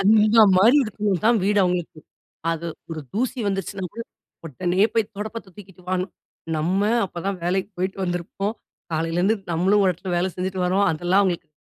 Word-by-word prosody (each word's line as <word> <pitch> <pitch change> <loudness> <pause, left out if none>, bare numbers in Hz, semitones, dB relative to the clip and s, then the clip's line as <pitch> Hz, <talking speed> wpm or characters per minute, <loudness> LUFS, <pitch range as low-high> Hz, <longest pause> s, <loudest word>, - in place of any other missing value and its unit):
அந்த 215 +2 +5 0.2
மாதிரி 225 +9 +6
இருக்கணும் 205 -4 -1
தான் 235 0 +5
வீடு 205 +1 +2
அவுங்களுக்கு. 180 -3 -1 0.5
அது 165 0 -3 0.2
ஒரு 160 -1 -4
தூசி 255 +4 -1
வந்துருச்சுனாகூட, 195 +2 -3 0.4
உடனே 175 +6 0
போய் 220 -2 +1
துடப்பத்த 210 -1 -6
தூக்கிட்டு 190 -3 -14
வான்னு. 185 0 0 0.5
நம்ம 180 +6 0 0.2
அப்ப 175 -2 -7
தான் 195 -1 -1
வேலைக்கி 185 +3 0
போயிட்டு 185 +2 -2
வந்திருப்போம். 180 +4 -3 0.4
காலையிலேருந்து 170 +7 +1 0.2
நம்மளும் 190 +5 +3
ஒரு 190 - +4
இடத்துல 180 +2 -7
வேல 175 +2 +1
செஞ்சுட்டு 185 0 -3
வரோம். 190 +3 +2
அதெல்லாம் 175 +5 +2
அவுங்களுக்கு 175 -4 -1
190 Hz, 155 wpm, -23 LUFS, 175-205 Hz, 0.5 s, மாதிரி